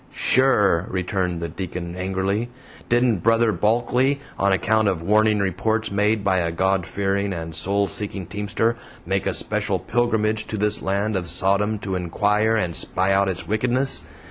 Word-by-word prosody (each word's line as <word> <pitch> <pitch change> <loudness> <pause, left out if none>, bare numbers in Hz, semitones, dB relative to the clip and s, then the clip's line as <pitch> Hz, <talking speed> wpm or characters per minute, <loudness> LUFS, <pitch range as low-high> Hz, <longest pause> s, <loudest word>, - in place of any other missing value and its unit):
"Sure," 105 -9 +3
returned 90 -2 -2
the 85 - -2
Deacon 85 +1 -6
angrily, 95 +5 -1 0.4
"didn't 120 -2 +3
Brother 115 +4 +3
Bulkley, 120 +6 +1 0.2
on 100 0 +3
account 110 +4 +2
of 90 -4 -1
warning 105 +3 +3
reports 100 +4 -1
made 105 +1 +1
by 95 -2 +2
a 85 -1 -1
God 95 +1 0
fearing 100 0 -1
and 80 -1 -6
soul 100 +5 0
seeking 100 -2 -6
teamster, 105 +4 -1 0.3
make - - -1
a - - 0
special - - 0
pilgrimage 110 -2 0
to 110 - -4
this 105 +1 0
land 100 +2 -1
of 90 -3 -2
Sodom 100 +5 +1
to 100 -2 -5
inquire 105 +5 +1
and 90 -7 -1
spy 95 +1 -1
out 100 0 +2
its 95 - -5
wickedness? 125 +5 0
100 Hz, 160 wpm, -22 LUFS, 95-110 Hz, 0.4 s, Sure